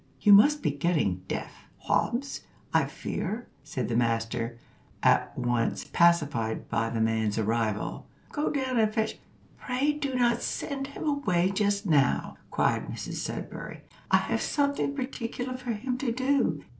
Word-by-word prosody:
"You 205 - +6
must 290 +9 +6
be 150 - +2
getting 140 - 0
deaf; - - -6
Hobbs, 250 +5 0 0.3
I - - +4
fear," 225 +4 -4 0.2
said 135 -6 -3
the 115 - -1
master, 115 0 0 0.5
at - - +3
once 120 -2 0
pacified 150 -10 +2
by 115 0 0
the 115 - -2
man's 110 -1 +1
arrival; 110 -1 -1 0.2
"go 295 0 0
down 260 -4 0
and 215 -1 +3
fetch 220 0 -1 0.2
" - - -29
"Pray 265 +3 +1
do 280 -3 -3
not 240 -1 +2
send 275 -2 -3
him 280 - -8
away 195 - +1
just 205 +1 +1
now," 150 -6 +2
cried - - +1
Mrs - - -5
Sudberry: - - -5 0.3
"I - - +6
have - - -1
something 280 -1 0
particular 255 -1 -4
for 250 -2 -3
him 250 +4 -3
to 255 -3 0
do. 260 - +1
205 Hz, 150 wpm, -28 LUFS, -, 0.5 s, You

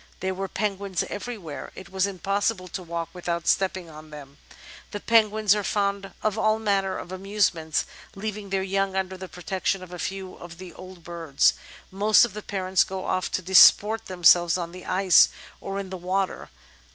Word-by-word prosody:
There 190 +1 -2
were 195 +1 -4
penguins 195 -2 -2
everywhere; 200 - -7
it 190 - -11
was 190 +1 +1
impossible 195 +1 -1
to 185 - -5
walk 170 -1 -5
without 170 -1 -3
stepping 185 -2 +1
on 155 -1 -12
them." 145 -1 -12 0.5
The 205 - -5
penguins 215 -2 +3
are 210 -1 -1
fond 200 0 -1
of 215 0 0
all 215 0 +2
manner 200 -3 0
of 175 - -8
amusements; 185 -5 0 0.3
leav 210 +1 -4
ing 205 -2 -9
their 190 0 -1
yoimg 195 0 -1
under 190 0 -2
the 185 0 -9
protection 185 +3 -3
of 180 -1 -11
a 180 - -7
few 190 +1 -5
of 170 -1 -11
the 180 -2 -10
old 185 -1 -12
birds, 165 -5 +1 0.4
most 210 +4 +5
of 230 - -8
the 210 - -6
parents 190 -2 +1
go 190 -1 -6
off 185 - -1
to 185 - -1
disport 205 +4 +6
themselves 175 -1 +4
on 170 -1 -5
the 180 0 -11
ice 185 0 +5 0.3
or 195 0 -5
in 195 -1 -5
the 190 - -4
water. 185 +2 -2
190 Hz, 185 wpm, -25 LUFS, 180-200 Hz, 0.5 s, disport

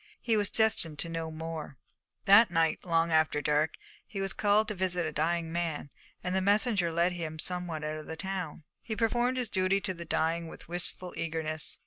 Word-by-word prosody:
He 230 -2 +1
was 205 -2 +1
destined 205 -8 +1
to 170 - -3
know 165 -1 -3
more. 160 -3 -6 0.5
That 205 +4 +8
night, 165 -2 +1
long 165 -1 +2
after 155 -2 +3
dark, 150 +1 +1 0.3
he 200 - -6
was 195 0 -1
called 210 +1 +3
to - - -1
visit 180 -2 +1
a 155 - -2
dying 165 +2 0
man, 165 -4 -2 0.3
and 180 - -1
the 190 - +2
messenger 200 -2 +2
led 170 +2 +2
him 165 -3 -4
somewhat 175 -2 -3
out 155 0 -3
of 155 - -9
the 160 - -5
town. 180 -3 -4 0.2
He 220 - -4
performed 240 +3 +1
his 250 -2 0
duty 190 -1 +2
to 190 -2 -1
the 170 -1 -7
dying 165 0 0
with - - -10
wistful 175 +1 -2
eagerness. 160 -1 -2
170 Hz, 195 wpm, -30 LUFS, 160-195 Hz, 0.5 s, That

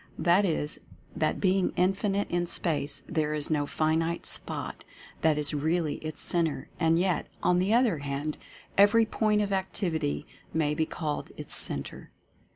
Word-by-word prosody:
That 175 +5 +4
is, 155 -4 -1 0.4
that - - 0
being 190 -1 +2
Infinite 195 +2 +1
in 175 0 0
Space, 145 -5 0
there 155 -2 0
is 150 +1 -2
no 145 -2 +1
finite 160 +2 0
spot - - -1 0.4
that 155 -2 +3
is 150 0 0
really 155 +1 0
its 155 -1 -5
Centre, 165 -3 0
and 165 -1 +3
yet, 180 -2 +1 0.2
on 180 0 +4
the 190 +3 +1
other 235 - +3
hand, 145 +2 -3 0.4
every 210 +3 +6
Point 210 -1 +2
of 200 -1 -2
Activity 175 -6 -1 0.3
may 150 -2 +2
be 160 +1 0
called 150 -3 -3
its - - -7
Centre. 70 -1 -4
165 Hz, 155 wpm, -28 LUFS, 150-190 Hz, 0.4 s, every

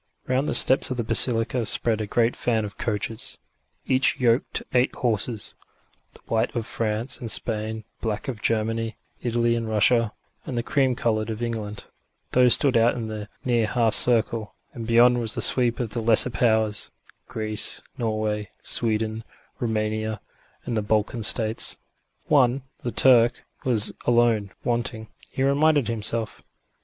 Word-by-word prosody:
Round 130 +3 0
the - - 0
steps 130 - +7
of 130 - -4
the 120 - -1
basilica 115 +1 +2
spread 115 -1 +1
a 105 - -4
great 115 +3 +1
fan 110 -3 -1
of 105 - -9
coaches, 115 +4 -3 0.5
each 130 0 +1
yoked 120 0 +1
to - - -3
eight 125 +1 +1
horses 115 -2 -1 0.6
the - - -13
white 110 +2 -1
of 115 -2 -2
France 115 +2 -3
and 115 - -6
Spain, 110 0 0 0.2
the - - -38
black 105 -1 -4
of 120 -6 -5
Germany, 115 0 -1 0.2
Italy 120 0 0
and 115 -1 -3
Russia, 110 +1 +2 0.3
and 125 - -6
the 120 - -1
cream 130 -1 +1
coloured 110 -2 -1
of 110 +1 -5
England. 110 -3 -5 0.5
Those 125 -2 +5
stood 135 -3 +1
out 115 +1 +3
in 115 -2 -4
the 110 -1 -7 0.2
near 120 -3 +1
half 115 -1 +1
circle, 115 -2 +4 0.2
and 115 -2 -7
beyond 120 +1 +4
was 115 -2 0
the - - -3
sweep 120 -2 +3
of 120 -3 -3
the 115 - -3
lesser 115 +2 +5
powers: 110 -3 0 0.4
Greece, 110 -1 -3
Norway, 110 -2 -3
Sweden, 110 -1 -1 0.4
Roumania 110 -1 -2 0.5
and 120 - -3
the 110 - 0
Balkan 110 +3 -1
States. 110 +1 0 0.5
One, 130 -2 +2 0.2
the 120 - -5
Turk, 120 -1 +3 0.2
was 115 -4 +1
alone 115 -4 +2
wanting, 115 -2 -3 0.2
he 135 - -3
reminded 145 -2 +2
himself. 115 0 -2
115 Hz, 155 wpm, -24 LUFS, 110-120 Hz, 0.6 s, steps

